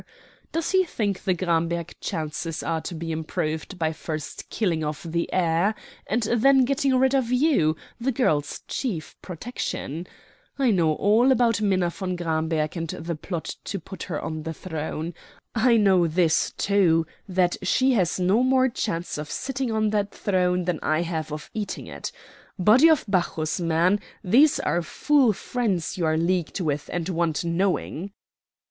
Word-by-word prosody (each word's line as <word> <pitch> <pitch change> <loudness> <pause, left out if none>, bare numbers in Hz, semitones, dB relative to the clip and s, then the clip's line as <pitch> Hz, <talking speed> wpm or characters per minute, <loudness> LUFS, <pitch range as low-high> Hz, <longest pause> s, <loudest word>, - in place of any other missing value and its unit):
Does 330 0 -1
he 375 -1 +4
think 205 - -2
the 185 - +2
Gramberg 170 -1 -1
chances 155 +1 -3
are 165 -1 -1
to 175 - -6
be 165 0 -4
improved 160 +2 -3
by 160 -2 0
first 155 -1 -6
killing 170 -8 0
off 150 +5 -4
the 170 0 -2
heir 180 +4 +2 0.3
and 230 +3 0
then 255 +4 +4
getting 275 0 +1
rid 265 +1 +3
of 260 -3 +1
you, 250 - +3 0.2
the 255 +3 0
girl's 150 - 0
chief 185 - -3
protection? 180 - -5 0.5
I 265 -4 +3
know 165 -6 +3
all 220 - +4
about 230 -4 +3
Minna 185 -4 +2
von 185 0 -3
Gramberg, 160 -2 -1
and 165 -1 -3
the 165 +1 -4
plot 165 +2 -5
to 195 - -3
put 190 +3 -10
her 165 -5 -3
on 155 0 -4
the 160 +1 -5
throne. 160 0 -4 0.4
I 235 0 +4
know 190 -5 +4
this, 165 0 +2
too, 180 -5 +3 0.2
that 180 -2 +1
she 255 +8 +3
has 185 -7 +1
no 190 +6 +3
more 260 0 +3
chance 175 - -3
of 150 0 -6
sitting 265 -2 -2
on 215 -1 +1
that 205 -1 0
throne 180 -2 +1
than 175 -3 -1
I 155 +2 +1
have 160 -2 -3
of 150 0 -7
eating 210 -2 -4
it. - - -6 0.5
Body 225 - +6
of 315 -3 +3
Bacchus, 175 -4 0
man, 170 +4 +2 0.2
these 275 +11 +5
are 175 - 0
foul 265 - +3
fiends 205 -5 -2
you 170 -3 0
are 155 0 +2
leagued 175 +1 0
with 150 -5 -2
and 175 -1 -2
want 170 -3 0
knowing." 185 +1 -1
180 Hz, 165 wpm, -25 LUFS, 160-220 Hz, 0.5 s, Body